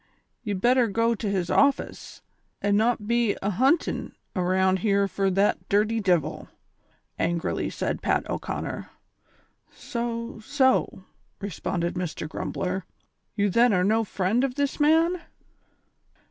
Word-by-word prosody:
Ye 210 -3 -3
better 240 +5 +3
go 230 +3 +1
to 215 -2 -3
his 185 -3 -1
office, 280 +6 0 0.4
an' 205 0 +1
not 220 0 +1
be 235 -2 +1
ahun 250 - +3
tin' - - -5 0.2
around 185 +1 +2
here 200 0 +2
fur 195 0 0
the 195 +2 +2
dirty 215 +3 +2
divil," 175 -7 0 0.7
angrily 170 0 -1
said - - -3
Pat - - 0
O'Conner. - - -4 0.8
"So, 235 -1 -4
so," 260 -5 +1 0.4
responded 180 -2 -3
Mr. 175 -3 -4
Grumbler; 185 +4 -3 0.5
"you 205 -1 +2
then 235 +2 +4
are 180 -1 +3
no 220 +4 +2
friend 205 +4 0
of 260 -2 -1
this 285 0 -1
man 325 +4 +3
205 Hz, 125 wpm, -26 LUFS, 190-240 Hz, 0.8 s, then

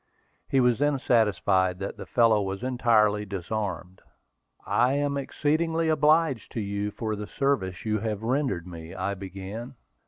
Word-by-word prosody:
He 135 - +3
was 125 -2 +3
then 145 -1 +2
satisfied 100 -7 +2
that 100 +1 -5
the - - -9
fellow 115 -3 +4
was 95 +3 -4
entirely 115 -5 +3
disarmed. 95 -2 -4 0.6
"I 125 +2 +2
am 145 0 0
exceedingly 160 +4 0
obliged 155 -4 +2
to - - -2
you 100 0 -2
for 110 +1 -3
the 105 0 -6
service 110 -11 -1
you 110 0 0
have 110 -1 -3
rendered 120 - 0
me," 85 0 -9
I 95 +1 -2
began. 100 +6 -7
110 Hz, 150 wpm, -26 LUFS, 95-135 Hz, 0.6 s, fellow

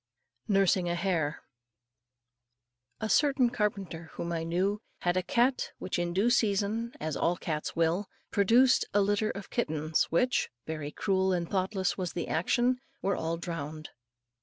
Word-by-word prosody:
NURSING 195 -3 +3
A 175 - 0
HARE. 170 -5 -1 1.6
A 220 - -2
certain 270 -1 +3
carpenter 195 -7 -2
whom 170 - -4
I 165 -1 -1
knew 190 +5 0 0.2
had 175 0 +1
a 185 - +2
cat 240 +8 +1
which 185 - -3
in 175 0 -1
due 200 +7 +2
season, 220 +1 +1
as 155 -1 -3
all 175 +4 +1
cats 155 -3 -3
will, 170 +4 +1 0.2
produced 235 +6 +5
a 205 - +5
litter 205 +2 +1
of 200 -1 -7
kittens 155 -7 0
which 245 +10 +1 0.2
very 155 -2 -4
cruel 190 +1 +1
and 170 -1 -1
thoughtless 190 +1 -1
was 180 -2 -2
the 170 - -3
action 245 +9 +1 0.2
were 195 -1 +1
all 165 +1 -2
drowned. 155 -3 -5
185 Hz, 150 wpm, -30 LUFS, 170-210 Hz, 1.6 s, produced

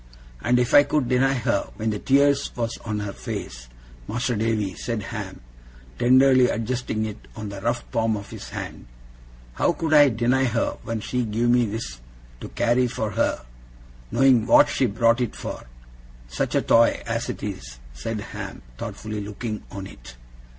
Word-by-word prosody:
'And 125 0 +2
if 125 -1 +1
I 145 - +10
could 145 -2 0
deny 135 +2 +2
her 105 -5 0
when 110 0 -1
the 105 - -3
tears 140 +2 +3
was 115 -1 -2
on 105 -2 -3
her 100 -1 -4
face, - - -6 0.4
Mas'r 120 +1 -1
Davy,' 105 -3 0
said 115 +2 -4
Ham, - - -6 0.6
tenderly 130 0 +5
adjusting 115 -1 -2
it 100 - -8
on 105 - -6
the 100 -1 -7
rough 120 +3 -1
palm 110 -1 +1
of 100 - -9
his - - -8
hand, - - -7 0.7
'how 170 - +2
could 160 -2 -1
I 145 -2 +8
deny 125 +3 +2
her 115 -2 -1
when 115 -1 -4
she 125 +3 -1
give 115 +2 +1
me 120 -1 +3
this 100 - -5 0.4
to - - -8
carry 120 +1 +2
for 110 -3 -3
her 90 - 0 0.6
knowing 125 -4 +4
what - - +6
she 130 - +1
brought 115 +3 +2
it 120 - -2
for? - - -6 0.6
Such - - -2
a - - +2
toy 115 0 +4
as 115 0 -2
it - - -5
is!' 65 -12 -6 0.2
said 105 - -4
Ham, - - -7 0.2
thoughtfully 110 -1 -5
looking 105 +1 -5
on 100 -1 -7
it. 60 -8 -12
115 Hz, 170 wpm, -24 LUFS, 105-125 Hz, 0.7 s, I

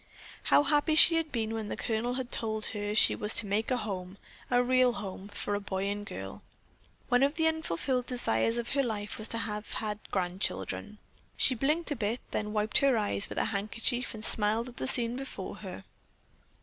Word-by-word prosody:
How - - +5
happy 295 +2 +2
she 330 +1 +8
had 325 -2 -1
been 225 -3 -2
when 220 -2 -3
the - - -4
Colonel 235 +2 -1
had 255 -2 -4
told 220 -1 -1
her 205 0 -3
she - - +6
was 210 +1 +1
to 230 - +8
make 205 +2 -1
a 255 - +1
home, 195 -4 -5 0.3
a 245 0 +3
real 255 0 +4
home, 195 -2 -6
for 205 0 -4
a 205 - 0
boy 190 -1 -3
and 205 0 -3
girl. 95 +1 -7 0.7
One 245 +1 +4
of 280 +2 +3
the 320 0 +1
unfulfilled 260 - 0
desires 230 - 0
of 235 0 -3
her 275 - +3
life 215 -5 -4
was 215 - +5
to 230 - -2
have 210 -2 -4
had 210 -1 -3
grandchildren. 175 - -2 0.4
She 260 - +4
blinked 300 +7 0
a - - 0
bit, 225 +1 -1
then 210 -1 -2
wiped 215 0 +2
her 275 -3 +4
eyes 205 -1 -1
with - - -7
her - - +2
handkerchief 230 +4 -2
and 215 0 -4
smiled 220 +3 +1
at 245 - -14
the - - -3
scene 240 -2 +2
before 270 +1 -6
her. - - -8
220 Hz, 200 wpm, -30 LUFS, 205-250 Hz, 0.7 s, she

